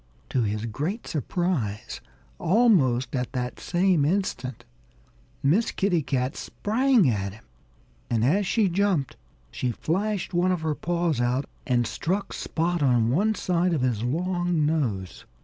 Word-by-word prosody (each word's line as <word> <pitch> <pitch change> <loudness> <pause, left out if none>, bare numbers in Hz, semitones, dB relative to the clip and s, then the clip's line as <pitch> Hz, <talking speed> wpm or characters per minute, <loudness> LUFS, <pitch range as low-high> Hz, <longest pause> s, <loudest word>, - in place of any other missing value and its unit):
To 130 - +1
his 105 0 -1
great 150 - -3
surprise, 150 - -2 0.4
almost 160 - +3
at 125 0 -2
that 125 -1 -3
same 175 -3 +2
instant 145 - -1 0.8
Miss 185 +12 +3
Kitty 190 -4 +1
Cat 130 0 -1
sprang 235 - +2
at 100 -5 -1
him. 115 +2 -15 0.7
And 115 -1 +1
as 185 +8 +2
she 215 0 +2
jumped, 185 -6 0 0.4
she 125 - -2
flashed 190 - -2
one 175 +1 +2
of 180 -3 -1
her 160 -1 0
paws 170 -4 -1
out 125 +3 +1 0.2
and 120 -3 +2
struck 190 - -2
Spot 170 +1 -1
on 120 -4 +3
one 210 +10 +2
side 180 -1 +1
of 150 - 0
his 125 -4 0
long 175 +4 0
nose. 115 - -2
160 Hz, 140 wpm, -26 LUFS, 125-185 Hz, 0.8 s, almost